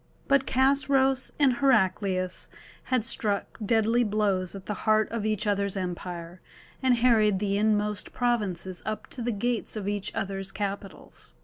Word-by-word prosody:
But 275 -1 +3
Chosroës 265 0 +2
and 270 -5 +3
Heraclius 190 -7 +1 0.4
had 255 -4 +1
struck 205 -3 -2
deadly 225 +3 +3
blows 200 -4 0
at 195 -1 -9
the 210 - -2 0.2
heart 215 0 +4
of 225 -2 -2
each 215 -1 -1
other's 200 -1 0
empire, 175 -1 -5 0.4
and 260 -2 +4
harried 225 -4 +4
the 200 0 -1
inmost 210 -1 0
provinces 205 -7 -1
up 215 0 -4
to 250 - -5
the 240 +1 -1
gates 235 +3 -2
of 205 -2 -4
each 205 0 -2
other's 195 0 -3
capitals. 200 -1 -6
210 Hz, 145 wpm, -27 LUFS, 195-240 Hz, 0.4 s, heart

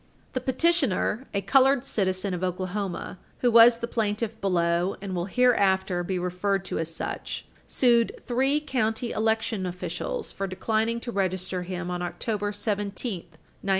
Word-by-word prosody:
The 255 - -1
petitioner, 265 - +1
a 200 - -1
colored 270 +2 +4
citizen 190 -4 0
of 180 0 -3
Oklahoma, 185 +1 -3 0.2
who 245 - +4
was 230 +1 +8
the 235 0 -4
plaintiff 220 0 -2
below 175 -1 +1
and 195 -1 -5
will 175 0 -1
hereafter 190 -6 +2
be 185 +1 -2
referred 180 +2 -1
to - - -3
as 165 0 -2
such, 165 - -5 0.2
sued 235 -2 +2
three 265 +4 +2
county 240 -5 -1
election 220 -3 0
officials 180 -1 -4
for 195 - -3
declining 220 +4 0
to 240 - -5
register 185 -2 -1
him 180 0 -4
on 180 0 -3
October 205 +3 -2
17, 205 0 -2
1934. 165 -2 -25
200 Hz, 150 wpm, -26 LUFS, 185-235 Hz, 0.2 s, was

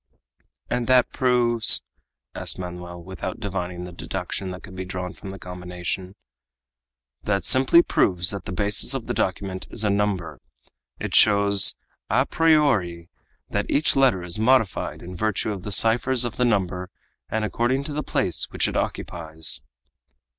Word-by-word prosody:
"And 120 -1 -2
that 130 -1 +4
proves?" 120 -3 +4 0.5
asked - - -1
Manoel, 90 -1 -7
without 95 0 -6
divining 90 -4 -4
the 90 - -8
deduction 95 +2 -5
that 90 0 -8
could 95 - -11
be 95 - -4
drawn 90 -1 -5
from 100 - -10
the 95 - -7
combination. 90 +1 -6 1.1
"That 100 +4 -1
simply 135 +6 +5
proves 90 - +2
that 100 -3 -6
the - - -5
basis 100 +3 0
of - - -4
the - - -2
document 95 -1 -2
is 110 - -4
a 105 - +2
number. 100 -4 -1 0.6
It - - -4
shows 100 -2 +5 0.3
à 130 +6 +2
priori 120 - +2 0.4
that - - -2
each 150 - +3
letter 130 -10 +3
is 90 +3 -2
modified 115 -3 +1
in 90 +1 -8
virtue 110 +1 -1
of 95 - -7
the 105 - -6
ciphers 120 +5 +3
of 115 -2 -4
the 125 - +2
number 90 -5 0 0.4
and 110 0 -1
according 120 +5 0
to 145 +1 -6
the 150 - -2
place - - 0
which - - 0
it - - -4
occupies." 80 -4 -2
100 Hz, 155 wpm, -24 LUFS, 90-120 Hz, 1.1 s, simply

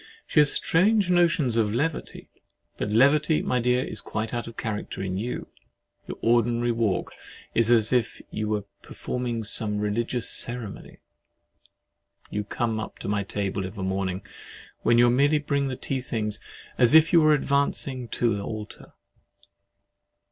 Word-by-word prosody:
She - - +2
has 150 -1 +7
strange 195 +2 +3
notions 165 -9 +2
of 110 -2 +2
levity. 145 +8 -3 0.4
But - - -3
levity, 145 +7 +3
my 125 - 0
dear, 125 +1 +1
is - - -2
quite 110 +2 -4
out 120 -1 -3
of 115 - -10
character 105 -3 -4
in 95 -1 -3
you. 120 +4 -5 0.6
Your - - -6
ordinary 120 +1 +2
walk 115 -5 -1 0.4
is 115 -1 +2
as 115 -1 +4
if 125 -2 0
you 110 0 -3
were 105 -1 -1 0.2
performing 120 -2 -4
some 105 0 -1
religious 115 +3 -1
ceremony: 120 -4 -2 1.3
you 105 - -2
come 110 +1 -2
up 110 - -7
to - - -7
my 100 0 0
table 100 0 -3
of 95 +3 -7
a 95 - -4
morning, 95 0 -2 0.6
when 115 - +3
you 120 +1 +6
merely 140 +4 +3
bring 140 -1 -1
in - - -2
the 130 - -3
tea 130 +1 -2
things, 105 -4 -3 0.4
as 125 +4 +5
if 160 +2 +6
you 170 - +7
were 155 -1 +5
advancing 140 -3 -1
to 115 -2 0
the 100 - -4
altar. 105 0 -8
120 Hz, 160 wpm, -25 LUFS, 105-140 Hz, 1.3 s, has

